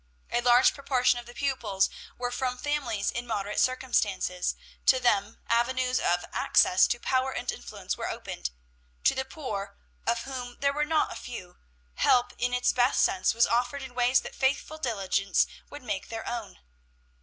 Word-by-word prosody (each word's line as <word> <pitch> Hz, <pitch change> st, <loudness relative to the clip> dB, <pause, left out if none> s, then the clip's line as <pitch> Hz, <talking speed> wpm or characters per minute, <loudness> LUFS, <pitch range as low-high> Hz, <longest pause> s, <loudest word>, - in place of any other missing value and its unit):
A 240 Hz, -, +1 dB
large 245 Hz, +1 st, +6 dB
proportion 255 Hz, -3 st, +2 dB
of 240 Hz, -, -11 dB
the 240 Hz, -, -12 dB
pupils 230 Hz, -9 st, +1 dB, 0.3 s
were 245 Hz, 0 st, -2 dB
from 250 Hz, 0 st, -2 dB
families 250 Hz, -8 st, -1 dB
in 240 Hz, +1 st, -4 dB
moderate 210 Hz, -2 st, -2 dB
circumstances; 210 Hz, -8 st, +1 dB, 0.3 s
to 260 Hz, -, +6 dB
them 210 Hz, -4 st, +1 dB
avenues 255 Hz, +2 st, +1 dB
of 175 Hz, 0 st, +1 dB
access 185 Hz, -, +4 dB
to 240 Hz, -, -1 dB
power 260 Hz, +1 st, +1 dB
and -, -, -2 dB
influence 60 Hz, 0 st, -5 dB
were -, -, -3 dB
opened. 60 Hz, -, -4 dB, 0.5 s
To -, -, +5 dB
the 265 Hz, -, -2 dB
poor, 210 Hz, -9 st, -6 dB, 0.3 s
of 235 Hz, 0 st, +1 dB
whom 250 Hz, -2 st, -6 dB
there 280 Hz, 0 st, +2 dB
were 300 Hz, +1 st, 0 dB
not 310 Hz, 0 st, +1 dB
a -, -, -9 dB
few, 185 Hz, -8 st, -8 dB, 0.4 s
help 245 Hz, -1 st, +3 dB
in 245 Hz, +1 st, +1 dB
its 250 Hz, 0 st, +2 dB
best 250 Hz, +1 st, +3 dB
sense 190 Hz, +3 st, +2 dB
was 230 Hz, -, +5 dB
offered 250 Hz, +4 st, 0 dB
in 260 Hz, -2 st, -9 dB
ways 245 Hz, +1 st, +3 dB
that -, -, -8 dB
faithful 280 Hz, +3 st, 0 dB
diligence 195 Hz, -6 st, +1 dB, 0.2 s
would 290 Hz, -2 st, -10 dB
make 205 Hz, -5 st, -4 dB
their 225 Hz, -1 st, -5 dB
own. 230 Hz, -5 st, -5 dB
245 Hz, 170 wpm, -28 LUFS, 210-260 Hz, 0.5 s, large